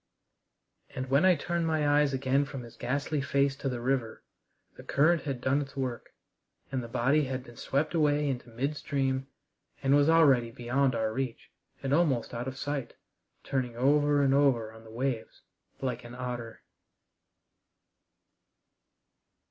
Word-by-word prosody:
And 130 Hz, 0 st, -4 dB
when 140 Hz, +6 st, +4 dB
I 185 Hz, -1 st, +6 dB
turned 170 Hz, +2 st, -1 dB
my 155 Hz, -2 st, +1 dB
eyes 145 Hz, 0 st, +4 dB
again 135 Hz, +1 st, +1 dB
from 135 Hz, -3 st, -7 dB
his 115 Hz, -, -12 dB
ghastly 140 Hz, +3 st, -1 dB
face 140 Hz, 0 st, +1 dB
to 135 Hz, -, -2 dB
the 125 Hz, -2 st, -3 dB
river, 125 Hz, -2 st, -1 dB, 0.5 s
the -, -, -11 dB
current 160 Hz, +4 st, +3 dB
had 135 Hz, -4 st, -3 dB
done 135 Hz, +3 st, +2 dB
its 140 Hz, -1 st, -8 dB
work, 130 Hz, -3 st, -3 dB, 0.6 s
and 130 Hz, -1 st, -1 dB
the 120 Hz, -, -7 dB
body 135 Hz, +6 st, +2 dB
had 130 Hz, -1 st, -4 dB
been 120 Hz, -2 st, -14 dB
swept 145 Hz, +7 st, -1 dB
away 150 Hz, -2 st, +2 dB
into 125 Hz, -3 st, -3 dB
midstream 135 Hz, +1 st, -1 dB, 0.6 s
and 135 Hz, 0 st, +3 dB
was 145 Hz, +1 st, +4 dB
already 140 Hz, -8 st, +5 dB
beyond 125 Hz, +3 st, 0 dB
our 110 Hz, -1 st, 0 dB
reach 130 Hz, -1 st, -4 dB, 0.3 s
and 135 Hz, 0 st, 0 dB
almost 145 Hz, -8 st, +2 dB
out 120 Hz, +2 st, -4 dB
of 130 Hz, 0 st, -5 dB
sight, 140 Hz, -2 st, -4 dB, 0.5 s
turning 125 Hz, -3 st, -2 dB
over 145 Hz, +2 st, +3 dB
and 135 Hz, -1 st, +3 dB
over 125 Hz, -6 st, +2 dB
on 110 Hz, 0 st, -14 dB
the 110 Hz, -, -14 dB
waves 120 Hz, 0 st, -3 dB, 0.4 s
like 125 Hz, -2 st, -2 dB
an 120 Hz, +1 st, -10 dB
otter. 120 Hz, -2 st, -6 dB
135 Hz, 155 wpm, -29 LUFS, 125-145 Hz, 0.6 s, I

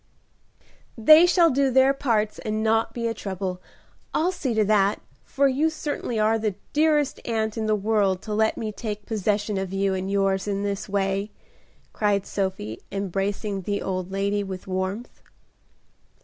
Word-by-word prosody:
"They 310 Hz, +10 st, +8 dB
shall 345 Hz, -2 st, +4 dB
do 275 Hz, +1 st, +2 dB
their 265 Hz, +1 st, +4 dB
parts 225 Hz, -6 st, 0 dB
and 215 Hz, 0 st, -2 dB
not 225 Hz, 0 st, +2 dB
be 235 Hz, -1 st, -3 dB
a 230 Hz, -, -1 dB
trouble; 190 Hz, -3 st, -4 dB, 0.5 s
I'll 345 Hz, +4 st, +2 dB
see 265 Hz, -10 st, -3 dB
to 215 Hz, -1 st, +3 dB
that, 205 Hz, -1 st, +2 dB, 0.3 s
for 280 Hz, 0 st, +2 dB
you 280 Hz, +4 st, +2 dB
certainly 295 Hz, -6 st, -4 dB
are 220 Hz, +1 st, +2 dB
the 215 Hz, -3 st, -1 dB, 0.2 s
dearest 300 Hz, -2 st, +2 dB
aunt 220 Hz, -2 st, -1 dB
in 220 Hz, -1 st, -2 dB
the 215 Hz, -, +3 dB
world 200 Hz, -3 st, +1 dB
to 215 Hz, -, -4 dB
let 220 Hz, +1 st, +1 dB
me 215 Hz, -1 st, -3 dB
take 210 Hz, -1 st, -6 dB
possession 210 Hz, -1 st, -1 dB
of 190 Hz, -1 st, -4 dB
you 195 Hz, 0 st, 0 dB
and 190 Hz, 0 st, -3 dB
yours 195 Hz, 0 st, +1 dB
in 200 Hz, 0 st, -1 dB
this 200 Hz, 0 st, -3 dB
way," 195 Hz, +1 st, -1 dB, 0.6 s
cried 205 Hz, -2 st, +1 dB
Sophie, 190 Hz, -, -3 dB
embracing 195 Hz, +1 st, -2 dB
the 200 Hz, +2 st, -2 dB
old 185 Hz, -1 st, -3 dB
lady 200 Hz, +1 st, 0 dB
with 190 Hz, -2 st, -7 dB
warmth. 190 Hz, +5 st, -4 dB
210 Hz, 165 wpm, -24 LUFS, 195-230 Hz, 0.6 s, They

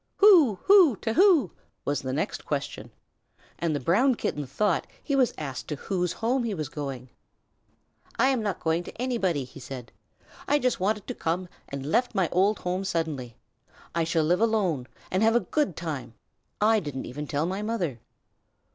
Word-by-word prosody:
"Who? 350 Hz, -, +7 dB
Who? 375 Hz, -, +7 dB
To 225 Hz, -, -1 dB
who?" 340 Hz, -, +5 dB, 0.3 s
was 145 Hz, -1 st, 0 dB
the 130 Hz, -, -3 dB
next 145 Hz, +5 st, -2 dB
question, 140 Hz, -6 st, -4 dB, 0.7 s
and 165 Hz, -3 st, 0 dB
the -, -, -1 dB
Brown 225 Hz, -, +3 dB
Kitten 145 Hz, -9 st, -3 dB
thought 195 Hz, +7 st, 0 dB, 0.2 s
he 280 Hz, -, 0 dB
was 255 Hz, -4 st, +3 dB
asked 135 Hz, -4 st, -5 dB
to 150 Hz, -, -3 dB
whose 180 Hz, +3 st, -2 dB
home 245 Hz, +3 st, 0 dB
he 220 Hz, -4 st, -2 dB
was 155 Hz, -4 st, -4 dB
going. 135 Hz, -4 st, -6 dB, 1.1 s
"I 260 Hz, +3 st, +4 dB
am 260 Hz, -4 st, +1 dB
not 205 Hz, -4 st, -2 dB
going 160 Hz, +1 st, +1 dB
to -, -, -10 dB
anybody," 200 Hz, -, 0 dB
he 130 Hz, +2 st, -12 dB
said. 125 Hz, -2 st, -8 dB, 0.6 s
"I 290 Hz, -, +4 dB
just 255 Hz, -6 st, 0 dB
wanted 205 Hz, +2 st, 0 dB
to -, -, -4 dB
come, 175 Hz, +3 st, -2 dB, 0.2 s
and 140 Hz, -1 st, -5 dB
left 240 Hz, -, +1 dB
my 190 Hz, -4 st, +2 dB
old 195 Hz, +4 st, +3 dB
home 180 Hz, +2 st, -2 dB
suddenly. 155 Hz, -10 st, -3 dB, 0.6 s
I 170 Hz, -, +1 dB
shall 160 Hz, 0 st, +1 dB
live 175 Hz, +6 st, +2 dB
alone 190 Hz, -, +1 dB, 0.2 s
and 185 Hz, -, +1 dB
have 225 Hz, +1 st, +4 dB
a -, -, +6 dB
good 295 Hz, -, -1 dB
time. 150 Hz, -8 st, -5 dB, 0.4 s
I 220 Hz, +1 st, +4 dB
didn't 145 Hz, -7 st, -5 dB
even 145 Hz, +4 st, -6 dB
tell 145 Hz, +3 st, 0 dB
my 190 Hz, +3 st, -2 dB
mother." 185 Hz, -, -2 dB
180 Hz, 180 wpm, -27 LUFS, 145-225 Hz, 1.1 s, Who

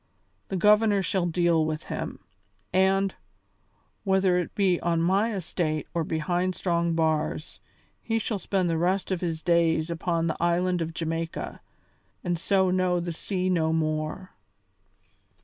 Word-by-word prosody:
The 195 Hz, -, -3 dB
Governor 210 Hz, +1 st, +4 dB
shall 180 Hz, 0 st, 0 dB
deal 170 Hz, -1 st, +2 dB
with 155 Hz, 0 st, -2 dB
him; -, -, -5 dB, 0.5 s
and, 190 Hz, +1 st, +3 dB, 0.9 s
whether 190 Hz, -2 st, +3 dB
it 175 Hz, -, -4 dB
be 190 Hz, -4 st, +2 dB
on 170 Hz, -1 st, 0 dB
my 195 Hz, +7 st, +2 dB
estate 160 Hz, -4 st, -2 dB
or 170 Hz, -1 st, 0 dB
behind 175 Hz, +4 st, -1 dB
strong 170 Hz, -2 st, 0 dB
bars, 155 Hz, -1 st, -1 dB, 0.4 s
he 225 Hz, -1 st, -1 dB
shall 215 Hz, -2 st, -2 dB
spend 190 Hz, -1 st, 0 dB
the 165 Hz, -1 st, 0 dB
rest 185 Hz, +3 st, 0 dB
of 185 Hz, -, -1 dB
his 165 Hz, -3 st, -3 dB
days 170 Hz, -1 st, +2 dB
upon 170 Hz, 0 st, -1 dB
the 160 Hz, -, -1 dB
island 175 Hz, +1 st, +1 dB
of 165 Hz, 0 st, -4 dB
Jamaica, 165 Hz, 0 st, -4 dB, 0.6 s
and 175 Hz, -2 st, -1 dB
so 190 Hz, 0 st, +2 dB
know 180 Hz, -1 st, +2 dB
the 170 Hz, 0 st, -3 dB
sea 185 Hz, +2 st, -2 dB
no 165 Hz, -3 st, +2 dB
more." 155 Hz, +3 st, -2 dB
175 Hz, 145 wpm, -26 LUFS, 165-190 Hz, 0.9 s, Governor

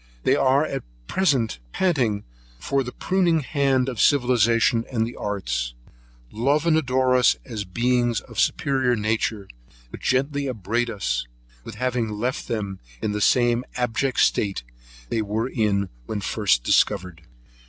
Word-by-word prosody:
They -, -, +3 dB
at 135 Hz, +1 st, +2 dB, 0.2 s
present 130 Hz, -, +1 dB
pant 125 Hz, -, +1 dB, 0.3 s
for 135 Hz, -, -1 dB
the 125 Hz, -, -6 dB
pruning 175 Hz, +1 st, +1 dB
hand 135 Hz, -2 st, +1 dB
of 125 Hz, -5 st, -2 dB
civilization 120 Hz, -2 st, +3 dB
and 115 Hz, -3 st, +1 dB
the 120 Hz, -, -7 dB
arts; 95 Hz, -12 st, -3 dB, 0.6 s
love 140 Hz, +8 st, +1 dB
and 165 Hz, -2 st, +4 dB
adore 130 Hz, -4 st, +2 dB
us 125 Hz, 0 st, +5 dB
as 110 Hz, -5 st, -5 dB
beings 120 Hz, +3 st, +1 dB
of -, -, -14 dB
a -, -, 0 dB
superior 130 Hz, -3 st, +2 dB
nature, 110 Hz, -2 st, -1 dB, 0.4 s
but -, -, -8 dB
gently 140 Hz, +2 st, 0 dB
upbraid 120 Hz, 0 st, -1 dB
us 100 Hz, -, -2 dB, 0.4 s
with -, -, -9 dB
having 125 Hz, -1 st, -1 dB
left 110 Hz, +5 st, -3 dB
them 100 Hz, -4 st, -3 dB, 0.2 s
in 105 Hz, -, -2 dB
the 105 Hz, 0 st, -2 dB
same 120 Hz, +1 st, +3 dB
abject 125 Hz, +2 st, -1 dB
state 100 Hz, -, +1 dB, 0.5 s
they 110 Hz, -, 0 dB
were 110 Hz, +4 st, -2 dB
at 100 Hz, -, -1 dB
first 95 Hz, -, +1 dB
discovered. 95 Hz, +2 st, +1 dB
120 Hz, 140 wpm, -23 LUFS, 105-130 Hz, 0.6 s, us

